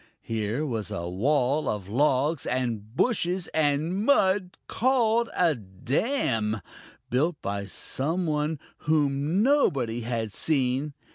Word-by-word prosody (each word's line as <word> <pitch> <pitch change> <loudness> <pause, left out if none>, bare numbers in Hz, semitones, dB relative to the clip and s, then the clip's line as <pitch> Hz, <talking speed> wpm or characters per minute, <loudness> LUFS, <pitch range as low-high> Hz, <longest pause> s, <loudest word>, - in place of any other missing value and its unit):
Here 115 +6 -2
was 110 - -3
a 85 -5 -4
wall 135 - +1
of 100 -3 -3
logs 140 +5 +1
and 115 -3 -2
bushes 185 - +1
and 160 +5 +1
mud 190 -7 +2
called 235 -2 +2
a 170 -3 +4
dam, 110 - -1 0.5
built 150 +6 +1
by 100 0 -2
some 160 - -2
one 150 0 0 0.2
whom 150 +4 +1
nobody 140 - +2
had 115 -2 -3
seen. 140 -1 0
145 Hz, 115 wpm, -26 LUFS, 115-170 Hz, 0.5 s, a